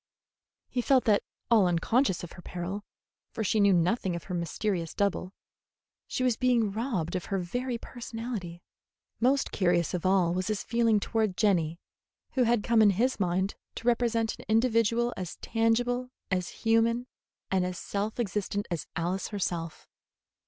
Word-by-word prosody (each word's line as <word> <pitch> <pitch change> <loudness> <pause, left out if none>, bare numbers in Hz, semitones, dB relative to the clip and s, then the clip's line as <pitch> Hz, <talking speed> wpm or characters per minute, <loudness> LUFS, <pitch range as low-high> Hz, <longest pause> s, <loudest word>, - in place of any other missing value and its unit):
He 245 - -1
felt 260 +1 +4
that, 210 -2 +4 0.3
all 215 -5 +6
unconscious 190 +5 +1
of 175 - -7
her 180 - -11
peril, 180 +4 -5 0.5
for 220 - -2
she 215 +1 +1
knew 200 -1 +5
nothing 180 +1 +2
of 170 - -5
her 170 - -6
mysterious 170 0 -2
double, 200 -2 0 0.8
she 255 - -2
was 245 -3 +2
being 240 -5 +2
robbed 215 - -2
of 180 - -2
her 195 - -1
very 245 +7 -2
personality. 225 -8 -6 0.6
Most 270 +3 +2
curious 175 -3 +1
of 180 - -2
all 185 -2 +3
was 185 0 -1
his 215 -2 -1
feeling 230 -2 +2
toward 215 -3 -1
Jenny, 170 -6 +2 0.5
who 255 -2 +2
had 230 -2 +2
come 230 -1 +4
in 210 - +7
his 235 +7 +1
mind 190 +1 0 0.2
to 230 - -6
represent 235 -2 +1
an - - -11
individual 230 +1 +2
as 180 -3 -5
tangible, 245 +2 0 0.2
as 180 -1 0 0.2
human, 230 +2 +3 0.5
and 190 -1 +2
as 180 0 -3
self 205 +3 -3
existent 205 -2 -1
as 170 -4 -3
Alice 180 +3 -1
herself. 175 -5 -3
205 Hz, 160 wpm, -29 LUFS, 180-235 Hz, 0.8 s, in